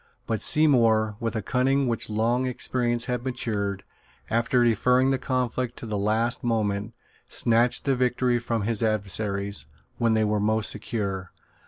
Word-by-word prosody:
But 110 -3 -2
Seymour, 115 -8 +4
with 115 -1 -3
a 110 - -2
cunning 135 +2 +1
which 115 -2 -2
long 115 +4 0
experience 120 -1 -1
had 125 -1 -3
matured, 100 -6 -3 0.5
after 120 +2 +2
deferring 125 +3 +3
the 135 - 0
conflict 125 -1 -2
to - - -8
the 110 -2 -4
last 110 +4 0
moment, 110 -1 -1 0.3
snatched 120 +1 +2
the 135 -2 +2
victory 125 -1 +1
from 115 -2 -2
his 115 +1 0
adversaries, 100 -5 0 0.3
when 115 -1 +2
they 110 - +2
were 105 0 0
most 110 +1 0
secure. 100 -5 -4
115 Hz, 150 wpm, -25 LUFS, 105-125 Hz, 0.5 s, Seymour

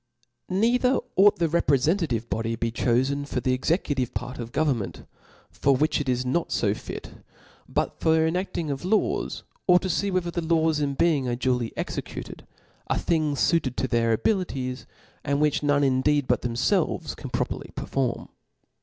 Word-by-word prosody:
Neither 240 +7 +3 0.2
ought 200 +2 +6
the 170 - +2
reprefentative 150 - +1
body 115 +3 -2
to - - -4
be 115 0 -1
chofen 130 +4 0
for - - -2
the 130 - 0
executive 135 -2 0
part 125 +1 -4
of 120 -1 -6
government, 135 -10 -1 0.5
for 140 -1 +2
which 150 +2 +1
it 140 - -3
is 125 0 0
not 145 +7 -1
fo - - +1
fit; - - -9 0.5
but - - -1
for 160 0 +3
the 160 - +3
enacting 170 -2 -2
of 135 +2 -4
laws, 205 +4 0 0.2
or 180 -1 +7
to 185 0 -1
fee 200 +4 0
whether 180 -2 -1
the 170 - -2
laws 160 -1 +2
in 140 -2 -1
being 145 -4 +2
are 120 - 0
duly 125 -2 0
executed, - - -6 0.4
a - - 0
thing 155 -3 +1
fuited 140 -4 +1
to 130 - -1
their 115 -2 +1
abilities, 130 - -1 0.4
and 140 0 0
which 150 -1 +2
none 145 -1 +2
indeed 140 +2 +2
but - - +2
themfelves 120 0 0
can - - -8
properly - - -3
perform. 130 -3 -2
145 Hz, 170 wpm, -25 LUFS, 125-170 Hz, 0.5 s, or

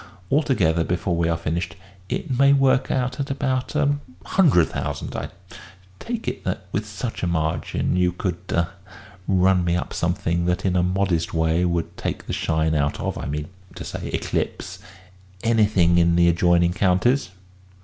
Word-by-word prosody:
Altogether, 110 - +2
before 90 +1 -1
we 85 0 +1
are 85 - +1
finished, 85 +1 -3 0.3
it 130 - -2
may 140 +2 +5
work 135 -1 +3
out 125 0 -1
at 140 - -2
about 135 -1 -1
a 145 -1 +2 0.3
hundred 140 - +4
thousand. - - -4
I - - -4 0.7
take 235 -1 -5
it - - -3
that, 95 0 -3
with 105 +2 -2
such 110 +3 -5
a 90 - 0
margin, 80 0 -1
you 90 -1 +2
could 90 -1 -3
ah 85 0 +1 0.6
run 95 -1 +3
me 85 0 +1
up 90 - -3
something 85 -1 0
that 90 +2 0
in 90 -1 +1
a 90 - +3
modest 90 -2 0
way 80 +2 +2
would 85 -1 -1
take - - -4
the - - -4
shine 80 -1 0
out 70 -1 0
of - - -2
I - - -5
mean 75 +3 -4 0.3
to - - -7
say - - -6
eclipse 95 +1 -3 0.6
anything 105 -7 +3
in 85 0 +3
the 85 0 +5
adjoining 85 0 +3
counties?" 95 +8 +2
90 Hz, 170 wpm, -23 LUFS, 85-115 Hz, 0.7 s, may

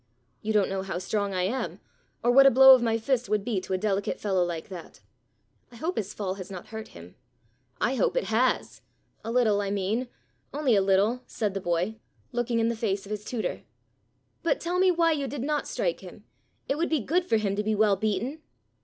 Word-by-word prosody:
You 215 - -2
don't 210 -2 +3
know 195 0 -1
how 190 -2 -4
strong 200 +2 -2
I 180 - 0
am, 240 +8 -2 0.4
or 240 - +4
what 275 +2 +8
a - - +9
blow 265 +1 +9
of 255 - +5
my 225 -1 +1
fist 245 +1 -1
would 210 -1 0
be 215 -6 -1
to 190 - -5
a - - +2
delicate 200 0 -1
fellow 190 -3 +1
like 170 -2 -4
that. 180 -3 -10 0.7
I - - -14
hope 330 +10 -3
his 205 -2 -3
fall 195 -3 -3
has 185 - -9
not 185 -3 -9
hurt 220 0 -7
him." 85 +1 -12 0.7
"I 245 - +1
hope 270 - +1
it - - +2
has - - 0 0.4
a 225 - -4
little, 225 -4 +3
I 200 - -2
mean, 205 +5 -1 0.5
only 280 -6 +2
a 200 - +4
little," 200 +6 +2
said 210 -3 -2
the 195 - -3
boy, 175 +5 -1 0.3
looking 240 -1 -1
in 225 0 +2
the 235 - 0
face 205 -3 -2
of 200 - -10
his 210 0 -4
tutor. 225 +1 -3 0.8
"But 335 -4 +1
tell 355 +2 -1
me 375 0 +5
why 335 -2 +3
you 285 -3 -1
did 275 -3 -5
not 295 +1 -1
strike - - -1
him. - - -12 0.4
It 280 +3 -1
would 340 - 0
be 315 -4 +1
good 345 - +1
for 230 -10 +1
him 200 -2 -1
to 210 - 0
be 215 +1 0
well 210 -1 +4
beaten." 220 +9 -2
220 Hz, 225 wpm, -27 LUFS, 195-260 Hz, 0.8 s, a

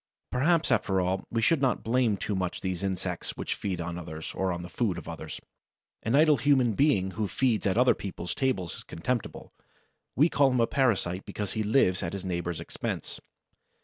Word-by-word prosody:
Perhaps, 160 +6 +2
after 95 -3 +2
all, 95 +1 -1
we 115 -1 -1
should 160 +4 +3
not 130 -2 +1
blame 115 -3 +2
too 105 - -3
much 90 -2 -2
these 95 -1 -2
insects 95 -2 -3
which - - -2
feed 95 -3 -3
on 85 +1 -4
others, 80 -2 -7
or 95 -1 0
on 85 0 -4
the - - -6
food 95 0 -1
of - - -8
others. - - -6 0.6
An 115 +4 +1
idle 150 0 +6
human 130 -5 +3
being 100 -7 +2
who 105 +1 -2
feeds 115 -2 +1
at 95 - +1
other 125 +1 +6
people's 95 -3 -5
tables 125 - -1
is - - -8
contemptible; 120 +8 -4 0.6
we 150 +5 +5
call 145 -4 +3
him 125 -1 +1
a 115 - +5
parasite 100 -9 +1
because 105 -2 -4
he 110 - -1
lives 105 -4 +3
at 85 - -3
his 100 -1 -5
neighbor's 85 -2 -2
expense. 80 - -5
100 Hz, 195 wpm, -28 LUFS, 90-125 Hz, 0.6 s, idle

